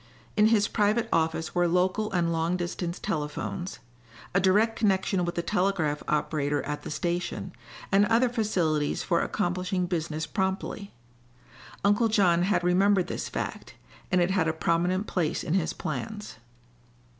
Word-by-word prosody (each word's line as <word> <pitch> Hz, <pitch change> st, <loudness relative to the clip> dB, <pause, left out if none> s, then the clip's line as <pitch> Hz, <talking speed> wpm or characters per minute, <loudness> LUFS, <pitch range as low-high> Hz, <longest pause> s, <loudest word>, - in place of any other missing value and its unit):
In 210 Hz, 0 st, +5 dB
his 215 Hz, -2 st, +3 dB
private 215 Hz, +2 st, +1 dB
office 160 Hz, 0 st, 0 dB
were 175 Hz, 0 st, +2 dB
local 185 Hz, +5 st, +1 dB
and 175 Hz, -3 st, +1 dB
long 165 Hz, +2 st, 0 dB
distance 175 Hz, 0 st, -3 dB
telephones, 175 Hz, +1 st, -4 dB, 0.6 s
a 195 Hz, -, +4 dB
direct 210 Hz, +4 st, +3 dB
connection 190 Hz, -3 st, +1 dB
with 175 Hz, 0 st, -3 dB
the 170 Hz, -, -1 dB
telegraph 175 Hz, -5 st, 0 dB
operator 150 Hz, -1 st, 0 dB
at 150 Hz, 0 st, -4 dB
the -, -, -7 dB
station, 175 Hz, +3 st, -2 dB, 0.4 s
and 200 Hz, +1 st, +5 dB
other 235 Hz, +2 st, +4 dB
facilities 180 Hz, -11 st, 0 dB
for 170 Hz, -2 st, +1 dB
accomplishing 180 Hz, -1 st, -1 dB
business 160 Hz, -2 st, -2 dB
promptly. 190 Hz, +3 st, -3 dB, 0.9 s
Uncle 205 Hz, +3 st, +4 dB
John 190 Hz, -6 st, +3 dB
had 185 Hz, 0 st, +1 dB
remembered 185 Hz, +1 st, +3 dB
this -, -, -4 dB
fact, -, -, -5 dB, 0.4 s
and 180 Hz, -, +4 dB
it 175 Hz, +1 st, +2 dB
had 180 Hz, -4 st, +2 dB
a 160 Hz, -, +1 dB
prominent 175 Hz, +4 st, 0 dB
place 170 Hz, -7 st, -1 dB
in 155 Hz, -, -2 dB
his 180 Hz, -4 st, +1 dB
plans. 205 Hz, -, -5 dB
180 Hz, 145 wpm, -27 LUFS, 165-200 Hz, 0.9 s, In